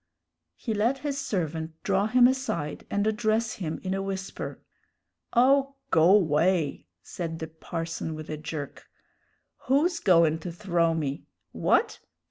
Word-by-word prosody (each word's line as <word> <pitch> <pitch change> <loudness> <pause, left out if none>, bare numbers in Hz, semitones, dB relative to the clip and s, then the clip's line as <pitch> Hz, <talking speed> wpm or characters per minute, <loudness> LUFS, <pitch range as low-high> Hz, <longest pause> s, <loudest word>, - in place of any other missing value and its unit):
He 220 - -3
let 225 +6 +1
his 280 -1 -1
servant 165 - -2
draw 200 +1 +2
him 245 +2 +5
aside 250 - -2
and 200 0 0
address 220 +1 +1
him 160 -2 -3
in 190 0 -2
a 195 - -1
whisper. 195 0 -5 0.7
"Oh, 275 +3 +4 0.2
go 170 +5 +6
'way!" 165 -2 +1 0.2
said 165 -2 -5
the 160 - -4
parson 165 0 -5
with 155 0 -8
a 155 - -4
jerk. 150 -1 -7 0.8
"Who's 330 +6 +2
goin' 165 -4 +4
to 175 +2 -6
throw 170 -3 +1
me? 145 -3 -3 0.2
What? - - +1
185 Hz, 135 wpm, -27 LUFS, 160-220 Hz, 0.8 s, go